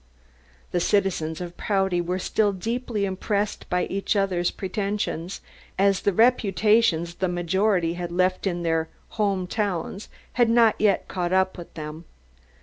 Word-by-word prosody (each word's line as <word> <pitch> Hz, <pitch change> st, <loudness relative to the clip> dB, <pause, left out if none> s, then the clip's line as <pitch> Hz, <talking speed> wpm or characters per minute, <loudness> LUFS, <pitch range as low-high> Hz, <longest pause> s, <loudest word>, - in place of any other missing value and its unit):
The 175 Hz, -, +1 dB
citizens 175 Hz, -4 st, 0 dB
of 175 Hz, 0 st, -7 dB
Prouty 190 Hz, -3 st, +1 dB
were 180 Hz, +2 st, -2 dB
still 205 Hz, +2 st, +1 dB
deeply 225 Hz, +1 st, -2 dB
impressed 200 Hz, +2 st, -2 dB
by 180 Hz, -1 st, +1 dB
each 195 Hz, +2 st, -1 dB
other's 185 Hz, -3 st, +1 dB
pretensions, 195 Hz, -2 st, -3 dB, 0.4 s
as 195 Hz, 0 st, +3 dB
the 200 Hz, -, +2 dB
reputations 210 Hz, -5 st, +3 dB
the 185 Hz, +2 st, -1 dB
majority 175 Hz, 0 st, +1 dB
had 175 Hz, 0 st, -5 dB
left 185 Hz, +2 st, +1 dB
in 175 Hz, -2 st, -2 dB
their 165 Hz, -1 st, 0 dB, 0.2 s
"home 200 Hz, -4 st, 0 dB
towns" 195 Hz, 0 st, -3 dB, 0.2 s
had 240 Hz, -2 st, +3 dB
not 230 Hz, -1 st, +5 dB
yet 205 Hz, -2 st, +2 dB
caught 180 Hz, -1 st, -2 dB
up 190 Hz, 0 st, +2 dB
with 175 Hz, -2 st, -10 dB
them. 155 Hz, +1 st, -7 dB
190 Hz, 145 wpm, -25 LUFS, 175-205 Hz, 0.4 s, not